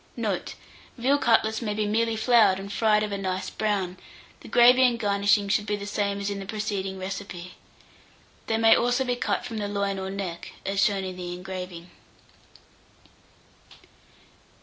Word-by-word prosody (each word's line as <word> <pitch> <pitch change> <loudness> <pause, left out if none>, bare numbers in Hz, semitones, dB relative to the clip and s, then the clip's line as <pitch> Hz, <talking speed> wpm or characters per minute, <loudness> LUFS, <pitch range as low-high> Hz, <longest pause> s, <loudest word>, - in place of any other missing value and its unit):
Note. - - -3 0.4
Veal 270 +4 +2
cutlets 220 -2 +2
may 210 -3 -2
be 215 0 0
merely 225 +2 +1
floured 220 -4 +4
and 200 +1 -7
fried 215 -1 +3
of 210 - -3
a 200 - -3
nice 190 -1 -3
brown; 195 -4 -1 0.4
the - - -13
gravy 245 +2 +6
and 245 -2 +3
garnishing 205 -1 +2
should 210 +1 0
be 210 - 0
the 200 0 -6
same 200 -1 -1
as 200 0 -2
in 200 - -4
the 195 - -6
preceding 200 -2 -3
recipe. 185 -2 -6 0.9
They 225 - +1
may 225 0 +6
also 245 +2 +1
be 250 -1 -1
cut - - -1
from 225 - -5
the 205 - -2
loin 200 -1 -2
or 190 0 -4
neck, 190 -3 -6
as 195 +1 +1
shown 200 -2 +1
in 185 -1 -6
the 175 -1 -5
engraving. 180 -1 -7
205 Hz, 170 wpm, -26 LUFS, 190-220 Hz, 0.9 s, gravy